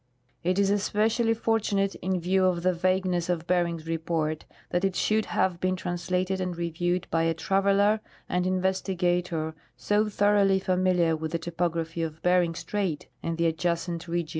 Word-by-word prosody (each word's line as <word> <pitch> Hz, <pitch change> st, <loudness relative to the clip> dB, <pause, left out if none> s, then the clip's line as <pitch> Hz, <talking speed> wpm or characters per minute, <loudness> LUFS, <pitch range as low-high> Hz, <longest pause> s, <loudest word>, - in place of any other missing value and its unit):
It 180 Hz, +2 st, +1 dB
is 200 Hz, 0 st, +3 dB
especially 220 Hz, +3 st, +1 dB
fortunate, 205 Hz, -3 st, 0 dB
in 185 Hz, 0 st, 0 dB
view 185 Hz, +2 st, +2 dB
of 175 Hz, -2 st, +1 dB
the 185 Hz, 0 st, +3 dB
vagueness 180 Hz, 0 st, 0 dB
of 170 Hz, -2 st, -1 dB
Bering's 170 Hz, -3 st, 0 dB
report, 160 Hz, -1 st, -2 dB, 0.3 s
that 175 Hz, +1 st, 0 dB
it 195 Hz, -1 st, +1 dB
should 215 Hz, 0 st, +1 dB
have 180 Hz, -2 st, 0 dB
been 185 Hz, +1 st, 0 dB
trans 175 Hz, -1 st, -5 dB
lated 185 Hz, +1 st, 0 dB
and 180 Hz, -2 st, -3 dB
reviewed 175 Hz, +1 st, -1 dB
by 165 Hz, -, +2 dB
a 165 Hz, 0 st, +1 dB
traveler 195 Hz, +5 st, +2 dB, 0.3 s
and 180 Hz, +1 st, 0 dB
investigator 180 Hz, -3 st, 0 dB, 0.2 s
so 210 Hz, +1 st, +1 dB
thoroughly 205 Hz, -1 st, +3 dB
familiar 180 Hz, -3 st, +2 dB
with 160 Hz, +1 st, -5 dB
the -, -, +2 dB
topography 165 Hz, 0 st, -2 dB
of 160 Hz, -1 st, -4 dB
Bering 180 Hz, -2 st, +3 dB
strait 175 Hz, -2 st, -3 dB
and 165 Hz, -1 st, -3 dB
the 170 Hz, -, +1 dB
adjacent 170 Hz, +1 st, -1 dB
region. 170 Hz, -1 st, -2 dB
180 Hz, 165 wpm, -27 LUFS, 170-190 Hz, 0.3 s, is